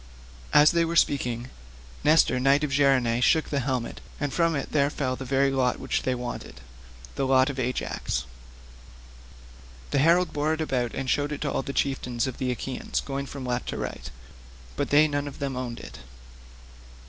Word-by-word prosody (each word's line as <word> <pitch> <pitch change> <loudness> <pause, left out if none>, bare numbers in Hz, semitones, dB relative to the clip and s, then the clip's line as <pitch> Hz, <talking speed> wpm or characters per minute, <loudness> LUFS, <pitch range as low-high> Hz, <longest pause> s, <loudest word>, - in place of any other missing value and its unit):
As 150 +1 +7
they 170 -1 +2
were 165 0 -2
speaking, 125 -5 +1 0.5
Nestor 150 -4 +4
knight 135 +3 +3
of 150 - -1
Gerene 130 -4 +3
shook 160 +5 +3
the 140 - 0
helmet, 130 -2 -3 0.2
and 145 -2 -2
from 165 -2 +2
it 140 - -4
there 140 -2 +3
fell 130 -3 -2
the 130 +1 -7
very 135 +1 +2
lot 130 -2 +1
which - - -1
they 130 - 0
wanted—the 60 - -8
lot 130 +1 +4
of 135 - -7
Ajax. 120 - -2 1.7
The - - +2
herald 170 +4 +3
bore 150 +2 +1
it 160 - -5
about 125 -6 -1
and 135 - -3
showed 145 +2 +1
it 145 - -4
to - - -1
all - - 0
the 140 - -5
chieftains 125 -4 -1
of 130 -2 -5
the 130 - -1
Achaeans, 125 +1 -3
going 140 0 -4
from 135 -1 -7
left 125 0 -2
to - - -3
right; - - -5 0.7
but - - -2
they 150 +2 +6
none 145 -1 -2
of 140 - -8
them 140 -2 -3
owned 125 -2 -4
it. - - -10
135 Hz, 185 wpm, -26 LUFS, 125-145 Hz, 1.7 s, As